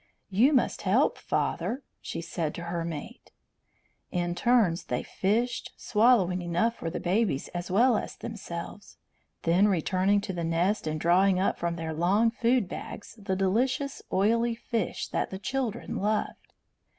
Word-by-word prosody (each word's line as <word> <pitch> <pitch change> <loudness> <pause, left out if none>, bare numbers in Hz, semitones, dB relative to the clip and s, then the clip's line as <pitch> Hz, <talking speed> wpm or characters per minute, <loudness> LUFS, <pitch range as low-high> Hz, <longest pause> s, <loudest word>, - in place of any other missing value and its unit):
"You 230 +10 +5
must 260 -5 +1
help, - - +2
father," 265 +3 -1 0.2
she - - -5
said 165 -2 -3
to 170 - -6
her 170 -1 -3
mate. 165 -3 -7 0.8
In 175 -1 -1
turns 215 -5 +2
they 125 - -2
fished, 230 +5 -1
swallowing 210 -5 +3
enough 175 +7 +1
for 165 - -4
the 165 - -4
babies 185 -6 0
as 175 0 -5
well 235 +6 +4
as - - -3
themselves, 200 -3 -7 0.5
then 175 +5 +4
returning 190 +2 +2
to 190 - -4
the 170 -1 -3
nest 170 +3 0
and 155 0 -2
drawing 180 +3 +4
up 190 - 0
from 170 0 -1
their 165 -1 -4
long 195 +8 +3
food 240 -2 +2
bags 200 - -8
the 195 -2 -1
delicious 250 +9 0
oily 230 +4 +2
fish 230 -3 -3
that - - -1
the 190 - -5
children 240 +1 -3
loved. 210 +2 -2
195 Hz, 150 wpm, -28 LUFS, 175-230 Hz, 0.8 s, You